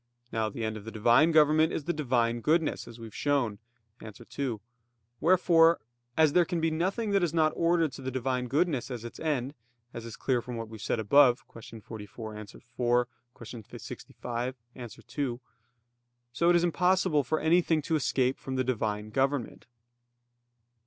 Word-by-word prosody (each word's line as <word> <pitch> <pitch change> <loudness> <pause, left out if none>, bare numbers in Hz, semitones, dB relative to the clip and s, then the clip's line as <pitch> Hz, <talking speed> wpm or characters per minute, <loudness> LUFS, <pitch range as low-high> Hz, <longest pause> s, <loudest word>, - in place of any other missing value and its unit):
Now 110 -1 -1
the 115 +3 -6
end 110 0 -3
of 105 - -11
the - - -5
Divine 120 +9 +4
government 155 +1 +4
is 155 - -3
the 175 - -1
Divine 120 -6 0
goodness; 160 +1 +1
as 120 -1 -11
we 115 - -8
have 110 - -11
shown 135 -8 0 0.4
(A. 110 - -8
2). 120 +2 -5 0.6
Wherefore, 170 -1 +5 0.4
as 155 -2 +4
there 180 - +5
can 170 0 -2
be 165 0 +1
nothing 195 +7 -1
that 200 -1 +3
is 170 -2 0
not 155 -1 +3
ordered 165 -2 +2
to 130 - -10
the 130 - -3
Divine 130 -1 -2
goodness 140 -1 0
as 120 -3 -6
its 120 - -9
end, 140 -4 -1 0.4
as 115 - -7
is 115 -1 -8
clear 125 -3 0
from 125 +1 -7
what 115 -1 -6
we 110 - -9
have - - -13
said 115 - -1
above 125 +3 +4
(Q. 115 -1 -12
44, 110 0 -8
A. 105 -1 -8
4; 120 +2 -1 0.3
Q. 115 0 -9
65, 125 +2 -6 0.2
A. 120 -2 -7
2), 125 0 -5 0.9
so 170 +7 +2
it 175 - +5
is 175 - +3
impossible 180 -2 +2
for 155 +5 -1
anything 160 -1 +2
to 160 - 0
escape 130 -3 0
from 130 - -5
the 130 - +1
Divine 110 -4 -2
government. 135 0 -1
130 Hz, 180 wpm, -29 LUFS, 115-160 Hz, 0.9 s, Wherefore